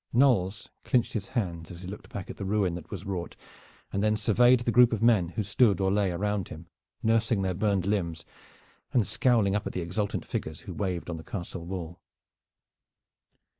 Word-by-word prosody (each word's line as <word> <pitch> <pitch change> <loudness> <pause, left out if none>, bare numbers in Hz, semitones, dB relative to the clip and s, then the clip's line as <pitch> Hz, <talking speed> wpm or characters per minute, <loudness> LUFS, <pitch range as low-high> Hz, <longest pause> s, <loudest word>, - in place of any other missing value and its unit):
Knolles 115 -6 +3 0.2
clinched 125 -2 +1
his 100 -4 -3
hands 85 -7 -2
as 85 0 -9
he - - -6
looked 100 +3 -8
back 100 - -6
at - - -11
the - - -5
ruin 95 -2 +1
that 85 -2 -7
was 100 -1 -6
wrought, 95 -3 -4 0.6
and 100 - 0
then 110 0 +2
surveyed 120 +3 +4
the 120 - 0
group 120 0 +6
of 115 -1 -1
men 110 -7 +4
who 110 - +1
stood 100 0 +3
or 95 -1 +2
lay 100 -1 +2
around 100 +1 -1
him 80 +2 -9 0.4
nursing 110 -2 +2
their 95 -1 0
burned 100 -1 +1
limbs 85 -7 -1 0.7
and 120 -5 +3
scowling 115 -7 +2
up 105 - -1
at - - -5
the 90 - -2
exultant 95 +5 -2
figures 80 -1 -4
who 95 - -8
waved 90 -1 -2
on 85 -2 -4
the 80 - -9
castle 85 -2 -6
wall. 90 -2 -6
100 Hz, 195 wpm, -28 LUFS, 90-110 Hz, 0.7 s, group